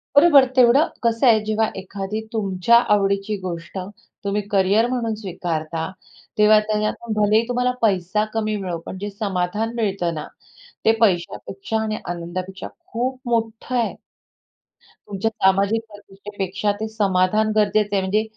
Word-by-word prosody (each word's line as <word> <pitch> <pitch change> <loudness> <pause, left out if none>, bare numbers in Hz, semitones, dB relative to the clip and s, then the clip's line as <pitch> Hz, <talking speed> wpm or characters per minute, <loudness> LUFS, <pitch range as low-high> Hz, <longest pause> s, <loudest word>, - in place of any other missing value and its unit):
बरोबर 285 -3 +7
तेवढं, 255 +6 +5 0.2
कसं 230 +2 +2
आहे, 225 -2 +6
जेव्हा 220 0 +1
एखादी 195 +3 -5
तुमच्या 200 +1 +3 0.2
आवडीची 200 +1 0
गोष्ट 170 0 -6 0.5
तुम्ही 200 +1 0
करियर 200 +4 +3
म्हणून 240 -3 -1
स्वीकारता, 165 -5 -4 0.5
तेव्हा 210 0 +6
त्याच्यातून, 215 +2 -2
भलेही 215 +2 +4
तुम्हाला 250 0 +1
पैसा 200 0 +1
कमी 215 -1 -1
मिळो, 185 -4 -3
पण 190 - -7
जे 205 - -3
समाधान 200 +2 -2
मिळतं 195 -7 -1
ना, 150 -2 -6 0.6
ते 225 - +7
पैशापेक्षा 195 +2 0
आणि 215 -1 -2
आनंदापेक्षा 175 +2 -5 0.2
खूप 255 +2 -2
मोठं 230 +1 -1
आहे. 235 -2 0 1.1
तुमच्या 205 +2 -1
सामाजिक 200 +2 +2
प्रतिष्ठेपेक्षा 200 -1 -4
ते 220 - -2
समाधान 210 0 +1
गरजेचं 210 -1 +2
आहे. 195 - +2
म्हणजे 205 +3 +1
210 Hz, 130 wpm, -22 LUFS, 190-225 Hz, 1.1 s, बरोबर